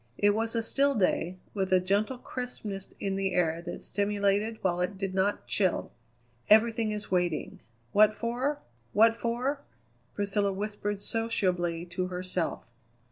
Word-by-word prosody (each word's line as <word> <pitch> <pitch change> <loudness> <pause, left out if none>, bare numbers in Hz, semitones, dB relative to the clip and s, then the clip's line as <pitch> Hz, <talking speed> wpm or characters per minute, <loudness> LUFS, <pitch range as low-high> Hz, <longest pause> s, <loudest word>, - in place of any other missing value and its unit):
It 205 0 +4
was 225 +2 -1
a 230 - +1
still 280 +4 +2
day, 185 -3 +1 0.2
with 190 -2 -1
a 185 - +6
gentle 200 +7 0
crispness 220 -6 -6
in 195 -1 -1
the 195 -1 0
air 165 -2 +1
that - - -7
stimulated 205 +2 0
while 180 -2 +1
it 190 +2 -1
did 195 -1 -3
not 195 +2 0
chill. 190 -3 0 0.6
"Everything 225 +1 +5
is 210 -2 -5
waiting. 175 -4 0 0.3
What 215 +1 +5
for? 250 +5 -1 0.4
what 225 +2 +6
for?" 245 +5 -1 0.5
Priscilla 205 0 +1
whispered 205 0 -3
sociably 180 -7 0
to 180 +1 -3
herself. 180 -1 -2
205 Hz, 140 wpm, -29 LUFS, 185-225 Hz, 0.6 s, a